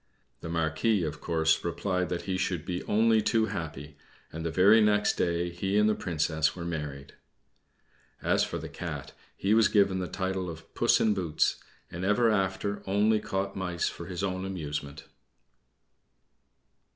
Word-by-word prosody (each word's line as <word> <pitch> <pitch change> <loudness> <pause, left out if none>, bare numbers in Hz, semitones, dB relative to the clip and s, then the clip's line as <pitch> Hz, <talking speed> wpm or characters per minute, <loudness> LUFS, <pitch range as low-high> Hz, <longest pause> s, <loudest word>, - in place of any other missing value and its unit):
The 85 - -7
Marquis, 85 +5 +1
of 75 -1 -4
course, 80 -1 +1
replied 90 +1 -1
that 85 0 -3
he 95 - -2
should 90 -4 -2
be 90 0 -3
only 110 +1 +3
too 110 +1 +2
happy; 75 -8 -6 0.4
and 80 +1 -5
the 85 - -1
very 100 +7 +6
next 105 -1 +3
day 85 0 0
he 95 +4 -1
and 105 0 +4
the 110 - +3
Princess 80 -4 0
were 85 -2 -6
married. 75 -4 -5 1.1
As - - +2
for - - -3
the - - -6
Cat, - - -6 0.3
he 100 +2 +1
was 110 -2 +5
given 100 -3 +3
the 90 - -3
title 95 -1 -3
of 80 -1 -10
Puss - - +3
in 110 - +3
Boots, 90 -6 0 0.3
and 85 +2 -5
ever 110 +4 +3
after 95 0 -1
only 105 +3 +3
caught 100 -1 -3
mice 90 -3 -1
for 85 - -9
his 90 0 -4
own 95 -1 -2
amusement. 75 -5 -5
90 Hz, 165 wpm, -28 LUFS, 80-100 Hz, 1.1 s, very